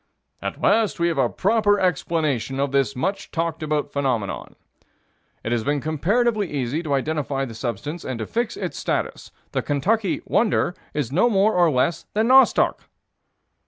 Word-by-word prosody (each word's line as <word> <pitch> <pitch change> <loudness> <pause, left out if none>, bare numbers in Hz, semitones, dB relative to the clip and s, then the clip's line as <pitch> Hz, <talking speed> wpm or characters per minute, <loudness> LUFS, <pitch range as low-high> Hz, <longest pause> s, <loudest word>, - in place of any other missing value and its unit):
"At - - -4
last 215 -3 +2
we 170 0 +2
have 160 -4 -1
a 125 -3 +3
proper 210 -3 +2
explanation 150 - 0
of 140 -1 0
this 135 -5 +1
much 195 +9 -2
talked 165 -1 -2
of 150 -2 -1
phenomenon." 125 -8 -2 0.9
"It 115 - -3
has 120 -2 0
been 145 +3 0
comparatively 200 - 0
easy 140 +2 -1
to 150 -4 -1
identify 140 -1 -1
the 120 - -8
substance 130 - -4
and 130 -2 -4
to 110 - -4
fix 235 - -2
its - - -4
status. - - -3 0.2
The - - 0
Kentucky 195 +9 0
'wonder' 215 -5 +1 0.2
is 140 -5 -1
no 185 - +3
more 210 0 +3
or 175 -2 +4
less 140 +4 0
than 220 +3 +2
nostoc." 265 0 +5
155 Hz, 160 wpm, -23 LUFS, 135-200 Hz, 0.9 s, nostoc